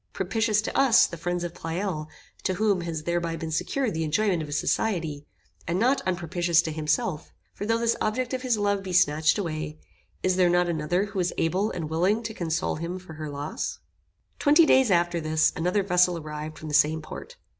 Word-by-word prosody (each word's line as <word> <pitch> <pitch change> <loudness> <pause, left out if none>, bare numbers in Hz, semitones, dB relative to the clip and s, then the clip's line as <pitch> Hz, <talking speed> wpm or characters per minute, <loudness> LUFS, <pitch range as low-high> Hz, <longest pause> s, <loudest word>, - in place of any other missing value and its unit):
Propitious 215 +3 0
to - - -4
us, 265 -4 +6
the - - -6
friends 175 +1 -2
of 175 -1 -4
Pleyel, 165 -2 -3 0.3
to 185 - -1
whom 205 -2 +1
has 165 -2 -4
thereby 170 0 -1
been 165 -1 -5
secured 245 - -1
the 160 0 -1
enjoyment 175 +3 +1
of 155 - -5
his 145 +1 -2
society; 160 -8 -1 0.4
and 170 +2 0
not 255 +7 +2
unpropitious 175 -1 +1
to 160 - -3
himself; 155 +1 -1 0.2
for 205 - -5
though 225 0 +2
this 230 0 +1
object 245 +4 -1
of 260 - -2
his 250 -4 +1
love 200 -1 +1
be 190 -1 -6
snatched 155 -2 +3
away, 155 -5 -4 0.5
is 185 0 +2
there 180 -1 +4
not 175 0 +3
another 170 +3 0
who 200 -1 -5
is 180 -1 0
able 185 +6 +1
and 165 -3 -4
willing 185 +8 +1
to 220 0 -4
console 165 -6 -2
him 170 +3 -4
for 185 -3 -11
her 155 -1 -6
loss? 145 +1 -4 0.6
Twenty 300 +3 +6
days 260 -5 +5
after 175 -2 +2
this, 155 0 +2
another 180 +5 +1
vessel 180 -2 +3
arrived 155 0 -6
from 155 - -8
the - - -5
same 155 +1 +3
port. 485 - -9
175 Hz, 200 wpm, -26 LUFS, 160-205 Hz, 0.6 s, us